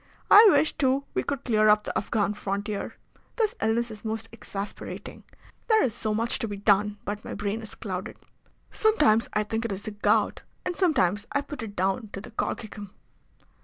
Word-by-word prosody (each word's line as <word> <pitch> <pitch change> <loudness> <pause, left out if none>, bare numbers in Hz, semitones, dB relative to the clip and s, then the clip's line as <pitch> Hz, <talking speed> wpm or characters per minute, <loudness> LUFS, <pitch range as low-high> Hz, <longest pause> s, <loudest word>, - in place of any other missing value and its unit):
I 430 +2 +10
wish, 300 -2 +3
too, 270 -1 +2
we - - +1
could 280 -3 -3
clear 215 -3 +3
up 210 0 +5
the - - -5
Afghan 205 -1 0
frontier. 205 0 -4 0.4
This 445 -2 +1
illness 230 +1 +1
is 215 -1 -10
most 220 0 -4
exasperating. 205 -3 -7 0.4
There 440 -2 +5
is 245 - 0
so 215 0 -2
much 230 +2 0
to 225 - -2
be 205 -1 -5
done, 205 0 +2
but 205 +1 -4
my - - -6
brain 205 +2 -2
is 220 - -8
clouded. 190 -4 -5 0.5
Sometimes 230 - +3
I 215 - +2
think 225 +2 -3
it 230 - -2
is 195 +1 -5
the 215 - -5
gout, 205 0 +1 0.2
and 360 - -2
sometimes 205 - +2
I 285 - +2
put 290 -1 -8
it 210 -2 -7
down 195 +4 0
to - - -4
the 240 - -11
colchicum." 210 -2 -4
215 Hz, 190 wpm, -27 LUFS, 205-240 Hz, 0.5 s, I